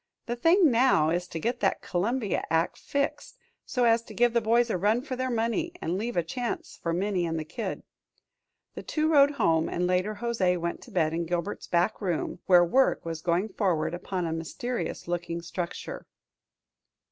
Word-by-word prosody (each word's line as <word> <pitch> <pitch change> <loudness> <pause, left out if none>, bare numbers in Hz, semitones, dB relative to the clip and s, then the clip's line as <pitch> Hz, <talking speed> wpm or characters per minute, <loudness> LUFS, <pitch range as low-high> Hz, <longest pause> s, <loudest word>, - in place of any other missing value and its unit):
The 240 - -2
thing 330 +5 +4
now 230 -11 +4
is 175 +1 -1
to 165 - -6
get 240 +8 -1
that - - 0
Columbia 210 +4 -1
act 165 +1 +1
fixed 280 0 -3 0.3
so 250 - 0
as 230 -1 +4
to - - -11
give 240 0 +3
the 235 - +3
boys 230 +1 +3
a - - 0
run 215 +6 +2
for 265 -3 -4
their 255 +1 -2
money, 235 +9 -1
and 170 - -2
leave 230 +3 -3
a 175 - +3
chance 260 - -4
for 170 - -1
Minnie 180 0 0
and 160 -1 -3
Kid." - - -5 0.9
The - - -7
two 310 0 -1
rode 285 -2 +7
home, 165 - +2
and 180 - -1
later 185 +4 0
José 195 -7 +1
went 170 0 -3
to - - -13
bed 160 -3 +1
in 170 0 -2
Gilbert's 175 +4 -3
back 175 +6 +1
room, 175 -3 -2
where 175 -2 +7
work 260 +5 +2
was 165 -1 -4
going 180 +5 0
forward 180 -6 0
upon 180 0 -3
a 160 - -2
mysterious 240 - -4
looking 170 -1 -3
structure. 170 +1 -5
190 Hz, 185 wpm, -27 LUFS, 170-240 Hz, 0.9 s, rode